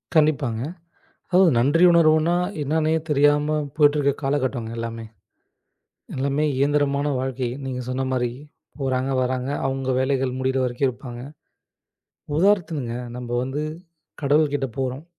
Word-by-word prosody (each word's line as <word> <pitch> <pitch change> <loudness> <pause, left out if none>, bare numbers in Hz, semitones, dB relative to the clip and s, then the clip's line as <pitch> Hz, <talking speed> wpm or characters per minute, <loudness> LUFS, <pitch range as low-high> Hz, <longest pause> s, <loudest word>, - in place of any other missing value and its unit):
கண்டிப்பாங்க. 145 -7 +2 0.7
அதாவது 180 -1 +5
நன்றி 145 +8 +3
உணர்வுன்னா 160 0 +4 0.3
என்னான்னே 155 +2 +1 0.2
தெரியாம 145 +1 +3 0.2
போயிட்டு 145 -1 +4
இருக்க 140 -1 +3
காலகட்டங்க 130 -4 -1
எல்லாமே 115 0 -5 1.1
எல்லாமே 140 +3 0
இயந்திரமான 145 0 +1
வாழ்க்கை. 130 -1 -2 0.2
நீங்க 130 -1 -4
சொன்ன 130 +1 -1
மாரி 125 -2 0 0.5
போறாங்க, 130 -1 -1
வர்றாங்க. 130 +1 -1 0.2
அவங்க 135 0 -2
வேலைகள் 130 -1 0
முடிற 130 0 0
வரைக்கும் 125 +2 0
இருப்பாங்க. 120 -1 -7 1.1
உதாரணத்துக்குங்க 160 - +1 0.2
நம்ப 125 -1 -7
வந்து 135 +4 -3 0.6
கடவுள் 145 +1 +3
கிட்ட 135 -1 0
போறோம். 130 +2 -3
135 Hz, 115 wpm, -23 LUFS, 130-150 Hz, 1.1 s, அதாவது